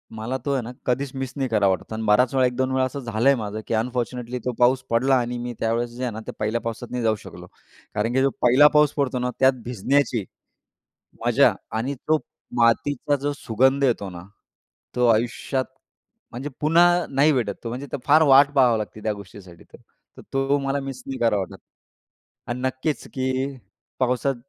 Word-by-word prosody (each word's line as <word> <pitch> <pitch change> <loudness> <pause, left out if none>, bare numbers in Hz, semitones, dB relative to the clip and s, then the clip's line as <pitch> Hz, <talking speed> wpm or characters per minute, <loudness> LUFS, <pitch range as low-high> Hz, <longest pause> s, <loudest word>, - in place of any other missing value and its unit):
मला 115 +4 -3
तो 140 - 0
आहे 130 - 0
ना, 120 - -7
कधीच 130 +2 -1
मिस 130 -1 -4
नाही 135 -2 -1
करावा 105 -3 +3
वाटत. 110 - -11
आणि 110 0 -4
बराच 125 +5 +4
वेळा 130 -1 +4
1-2 130 +1 -1
वेळा 130 0 +2
असं 140 +2 -5
झालंय 120 +2 +2
माझं 110 -2 -4
की - - -2
अनफॉर्च्युनेटली 125 +1 -2
तो 125 - 0
पाऊस 125 +1 +4
पडला 130 +3 +3
आणि 120 0 -3
मी 120 0 -5
त्यावेळेस 115 +1 0
जे 125 +2 -7
आहे 125 - -1
ना, 110 - -6
ते - - -3
पहिल्या 110 +2 -1
पावसात 115 +1 -5
नाही 125 -1 -2
जाऊ 110 -1 +2
शकलो - - -11 0.5
कारण 110 +3 0
की 130 - +2
जो 135 - +3
पहिला 130 +5 +7
पाऊस 150 -1 +5
पडतो 130 -3 0
ना, 125 - -1
त्यात 130 0 +5
भिजण्याची 125 0 0 1.0
मजा - - +4 0.2
आणि 125 +5 -2
तो 155 0 +4 0.4
मातीचा 145 +5 +2
जो 145 +1 -1
सुगंध 135 +3 +2
येतो 115 -6 +1
ना, 85 -1 -9 0.7
तो 125 -1 +3
आयुष्यात 120 +3 0 0.7
म्हणजे 130 +5 -5
पुन्हा 175 +3 +4
नाही 140 +3 +3
भेटत 120 -6 0
तो. 115 - -4
म्हणजे 130 +4 -6
तर - - -2
फार 155 +2 +6
वाट 140 0 +6
पाहावी 125 -4 +5
लागते 110 0 -6
त्या 110 - 0
गोष्टीसाठी 95 -4 -13
तर. - - -17 0.4
तर - - -10
तो 135 +1 +2
मला 140 +1 -1
मिस 135 -2 -7
नाही 135 -1 -5
करावा 115 -3 +2
वाटत. - - -13 0.9
आणि 120 +1 -3
नक्कीच 130 +3 -2
की 130 +1 -1 0.5
पावसात 130 +2 +1
125 Hz, 190 wpm, -23 LUFS, 115-135 Hz, 1.0 s, पहिला